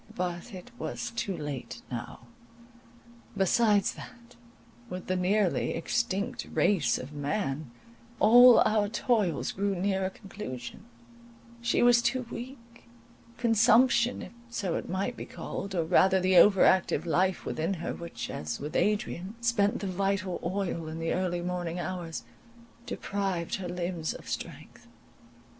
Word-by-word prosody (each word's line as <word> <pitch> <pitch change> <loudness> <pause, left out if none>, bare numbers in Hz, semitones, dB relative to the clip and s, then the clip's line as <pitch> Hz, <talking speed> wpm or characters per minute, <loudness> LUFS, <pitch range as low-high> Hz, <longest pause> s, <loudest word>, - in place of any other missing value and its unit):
But 175 +4 -3
it 190 +5 -10
was 240 - -4
too 230 -5 -3
late 130 -7 -6
now. 120 -1 -6 1.2
Besides 205 +1 +3
that, 240 0 -13 0.5
with 180 0 -6
the 185 - -1
nearly 185 +1 +1
extinct 200 +3 -2
race 200 -5 +2
of 135 +4 -8
man, 145 - -2 0.5
all 245 +3 +8
our 215 -1 +2
toils 205 - 0
grew 200 0 -1
near 190 +1 0
a 190 - 0
conclusion, 190 - -8 0.8
she 235 0 +2
was 240 0 +6
too 245 +1 0
weak; 235 -1 -10 0.5
consumption, 235 +1 +4
if - - -9 0.2
so 200 -7 -2
it - - -4
might 195 +7 -2
be - - -7
called, 195 -1 -6
or 170 - +1
rather 190 +4 +4
the 185 0 +2
over 195 +2 +7
active 175 -4 +3
life 185 +2 +1
within 165 +5 -1
her, 170 - -4
which, 165 -9 -6
as 75 0 -4
with 150 +2 -6
Adrian, 205 -1 0
spent 230 -3 +1
the - - -3
vital 195 -1 -1
oil 180 -4 -2
in 160 +1 -6
the 165 0 -1
early 180 -1 -1
morning 175 -1 -3
hours, 165 -6 -4 0.6
deprived 195 -4 -3
her 180 -2 -5
limbs 175 -2 -3
of - - -11
strength. - - -7
190 Hz, 140 wpm, -29 LUFS, 170-215 Hz, 1.2 s, all